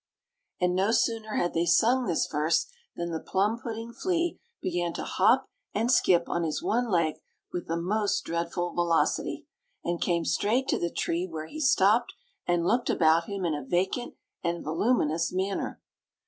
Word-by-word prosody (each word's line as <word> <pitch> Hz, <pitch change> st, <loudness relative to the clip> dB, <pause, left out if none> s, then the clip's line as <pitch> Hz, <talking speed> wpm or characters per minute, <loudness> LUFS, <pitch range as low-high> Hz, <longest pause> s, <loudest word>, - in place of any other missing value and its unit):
And 180 Hz, -1 st, +2 dB
no 190 Hz, +3 st, +2 dB
sooner 225 Hz, -1 st, 0 dB
had 175 Hz, -, 0 dB
they 170 Hz, +1 st, +1 dB
sung 235 Hz, +9 st, +4 dB
this 170 Hz, -, +1 dB
verse 155 Hz, +2 st, +1 dB, 0.3 s
than 170 Hz, 0 st, -3 dB
the 160 Hz, -, -2 dB
plum 205 Hz, +7 st, 0 dB
pudding 230 Hz, 0 st, -6 dB
flea 345 Hz, +1 st, -1 dB, 0.2 s
began 175 Hz, -1 st, -1 dB
to -, -, -4 dB
hop -, -, +3 dB, 0.3 s
and 230 Hz, +4 st, +2 dB
skip 175 Hz, -8 st, +4 dB
on 170 Hz, -, -1 dB
his 160 Hz, -2 st, -1 dB
one 240 Hz, +2 st, +1 dB
leg 165 Hz, -5 st, +1 dB, 0.4 s
with 175 Hz, -, -4 dB
the 165 Hz, -, -1 dB
most 205 Hz, +5 st, 0 dB
dreadful 170 Hz, +1 st, -2 dB
velocity, 170 Hz, -1 st, 0 dB, 0.4 s
and 170 Hz, 0 st, -2 dB
came 170 Hz, -2 st, +1 dB
straight 245 Hz, +6 st, +1 dB
to -, -, +1 dB
the 170 Hz, -, -1 dB
tree, 170 Hz, +2 st, -1 dB
where 160 Hz, -3 st, -6 dB
he 310 Hz, -, -8 dB
stopped, 235 Hz, -4 st, +3 dB, 0.3 s
and 175 Hz, -1 st, +1 dB
looked 240 Hz, +6 st, +1 dB
about 165 Hz, +1 st, +4 dB
him 200 Hz, -1 st, -4 dB
in 165 Hz, -, +1 dB
a 145 Hz, -1 st, -3 dB
vacant 190 Hz, -, -1 dB, 0.3 s
and 170 Hz, 0 st, -1 dB
voluminous 165 Hz, -1 st, +1 dB
manner. 190 Hz, +2 st, -2 dB
175 Hz, 170 wpm, -28 LUFS, 170-220 Hz, 0.4 s, sung